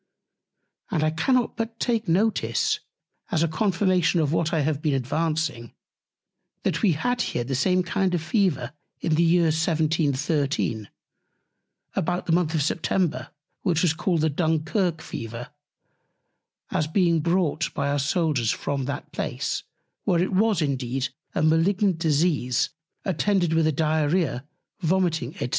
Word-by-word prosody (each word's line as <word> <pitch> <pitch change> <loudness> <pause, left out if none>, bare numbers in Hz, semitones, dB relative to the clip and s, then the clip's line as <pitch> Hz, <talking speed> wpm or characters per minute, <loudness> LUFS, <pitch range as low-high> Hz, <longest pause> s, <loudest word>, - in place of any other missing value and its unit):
And 160 -7 0
I 155 - +2
cannot 245 +10 +1
but 225 0 -4
take 230 -3 0
Notice, 200 +6 +1 0.5
as 170 -7 +1
a - - +2
Confirmation 180 0 +2
of 155 -1 +1
what 165 0 +1
I 160 - +1
have 145 0 -1
been 150 -3 +1
advancing, 150 -2 -2 0.9
that - - 0
we 200 -6 +4
had 245 +10 0
here 120 - -1
the 135 - -4
same 180 +8 +2
kind 185 +1 0
of 165 - -2
Fever 165 - 0 0.3
in 160 - 0
the 155 - +3
Year 170 +1 +4
1713, 150 - 0 1.1
about 175 +2 -1
the - - -1
Month 165 -1 +2
of 150 - +2
September, 155 -4 0 0.3
which 175 -4 +1
was 170 -4 +3
called 165 0 0
the 160 0 +2
Dunkirk 160 +2 0
Fever, 115 +4 -7 1.2
as 155 - 0
being 170 0 +2
brought 170 0 0
by 140 -1 0
our 145 0 +1
Soldiers 145 - +1
from 140 +1 -2
that 140 +3 -5
Place; - - -2 0.4
where 180 -5 +2
it 185 +3 0
was 200 -3 +3
indeed 130 -2 -1 0.3
a - - +1
Malignant 175 +3 +2
Disease 150 -6 +1 0.3
attended 190 -1 +1
with 160 -1 +3
a - - +3
Diarrhœa, 155 -1 0 0.3
Vomiting, 165 -6 0
&c. - - -3
160 Hz, 145 wpm, -25 LUFS, 145-180 Hz, 1.2 s, we